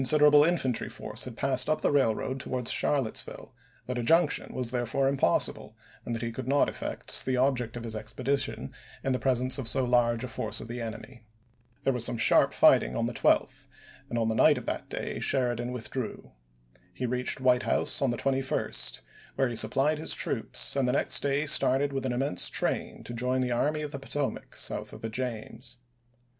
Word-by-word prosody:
siderable 150 +2 +7
infantry 135 -9 -1
force - - -4
had 125 -3 -9
passed 135 +1 +1
up 155 - 0
the - - +1
railroad 130 -1 0
towards 125 -2 -2
Charlottesville; 135 -7 -1 0.3
that 125 -1 -3
a - - -2
junction 165 +4 +2
was 125 -2 -3
there 120 -1 -2
fore 135 +3 0
impossible, 135 -10 +1 0.3
and 120 - -4
that 115 - -5
he 115 - -3
could 130 +2 -7
not 140 +1 +3
effect - - -2
the 130 -1 0
object 125 -3 0
of 120 - -7
his 115 -2 -6
expedition 115 - -3 0.3
in 135 - -1
the 130 - -1
presence 130 0 +1
of 130 - -3
so 130 +2 +4
large 120 -1 +1
a - - -3
force 110 -2 -1
of - - -8
the 120 +1 -6
enemy. 115 +2 -8 0.6
There 135 - +1
was 125 -2 -1
some 120 - +1
sharp 115 - +4
fight - - +5
ing - - -5
on - - 0
the - - -3
12th, - - +1 0.4
and 120 - -3
on 115 -1 0
the 110 - 0
night - - +4
of - - -7
that - - -4
day - - -5
Sheridan 120 -2 -1
withdrew. 125 0 -6 0.6
He 130 - -5
reached 125 +1 -2
White 125 -1 +3
House - - +3
on 135 - +2
the 120 - -2
21st, 135 +1 -1 0.3
where 135 -2 +1
he 120 - -5
supplied 135 +8 +3
his 160 - +1
troops, - - 0
and 135 -2 +1
the 125 - +1
next - - +4
day 140 +1 0
started 140 -1 +3
with 135 -1 -2
an - - -2
immense 120 -6 +1
train - - -3
to 120 - -7
join 125 +2 -1
the 125 -1 -1
Army 150 +5 0
of 150 - -5
the 140 - -6
Potomac 135 +1 -4
south - - -3
of - - -11
the 115 - -4
James. 125 +1 -5
125 Hz, 200 wpm, -28 LUFS, 120-135 Hz, 0.6 s, siderable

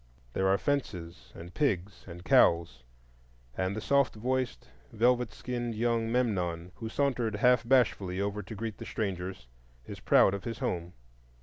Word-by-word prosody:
There 95 - +1
are 95 +1 +4
fences 95 -13 -3
and 85 +1 -10
pigs 100 - -1
and 90 0 -10
cows, 85 -6 +4 0.7
and 95 +1 -1
the 110 - -4
soft 140 +1 +2
voiced, 130 +3 -2 0.2
velvet 125 +2 +2
skinned 120 -2 -4
young 115 0 0
Memnon, 90 -8 -1
who 115 - -5
sauntered 120 -5 0
half 125 +2 +4
bashfully 100 -8 +2
over 100 +1 -2
to 100 +3 -9
greet 110 0 -5
the - - -7
strangers, 95 - -4 0.4
is - - -8
proud 95 - +4
of 100 - -4
his 115 -2 -4
home. 85 0 -3
105 Hz, 150 wpm, -30 LUFS, 90-120 Hz, 0.7 s, are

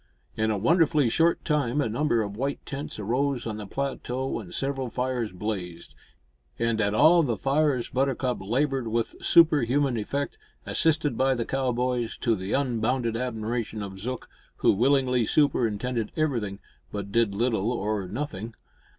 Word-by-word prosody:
In 110 0 0
a 105 - +1
wonderfully 155 - +3
short 165 +7 +2
time 150 -3 +1
a 145 - +1
number 120 0 +1
of 100 -1 -6
white 135 +5 -3
tents 140 +1 -5
arose 125 +5 0
on 110 -2 -3
the 105 -2 -7
plateau 130 +1 -3
and 95 -6 -10
several 135 -2 -2
fires 125 -2 -2
blazed, 90 -3 -5 0.6
and 115 -1 +1
at 105 0 +1
all 160 +8 +6
the 120 -8 0
fires 140 -3 +1
Buttercup 130 -3 0
laboured 130 +4 0
with 115 +1 -1
superhuman 145 -5 +4
effect, 140 +7 -3 0.3
assisted 150 -6 +1
by 135 0 +3
the 115 -2 -2
cowboys, 125 -2 -1
to 115 - +1
the 95 +1 -5
unbounded 120 -2 0
admiration 115 -2 -3
of 95 -1 -7
Zook, 125 +5 -4 0.3
who - - +3
willingly 125 +1 +2
superintended 125 -5 +1
everything, 120 -11 -1 0.3
but 100 -1 -5
did 115 -2 +2
little 115 -1 +1
or 105 -4 -2
nothing. 110 -1 -5
120 Hz, 150 wpm, -26 LUFS, 110-140 Hz, 0.6 s, all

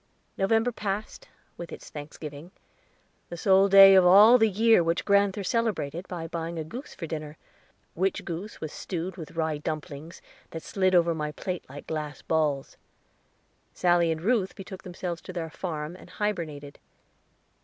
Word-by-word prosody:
November 225 +5 +2
passed, 210 -1 -5 0.3
with 170 0 -8
its - - -10
Thanksgiving 150 +1 -8 0.8
the 175 - -7
sole 195 +2 +4
day 195 0 +9
of 190 -1 +7
all 205 +7 +8
the 225 -1 +4
year 220 -1 +4
which 165 +1 -1
grand'ther 200 0 +2
celebrated, 190 - -1
by 170 -3 -5
buying 165 0 -5
a 160 - -2
goose 240 - -9
for 170 - -6
dinner, 155 -1 -6 0.6
which 190 +3 -1
goose 175 +5 -6
was 155 - -6
stewed 180 0 -5
with 165 -3 -10
rye 160 -2 -1
dumplings, 155 +1 -6 0.3
that 165 - -7
slid 185 -1 +1
over 170 -1 +4
my 150 -1 -3
plate 180 +1 -5
like 140 +2 -10
glass 150 -2 -5
balls. 150 -4 -1 1.0
Sally 175 -2 +3
and 160 0 -3
Ruth 215 -3 +1
betook 190 -1 -9
themselves 175 -1 -5
to 185 - -9
their 165 -2 -4
farm, 155 -1 -5
and 180 - -14
hybernated. 160 -8 -4
175 Hz, 155 wpm, -27 LUFS, 160-195 Hz, 1.0 s, day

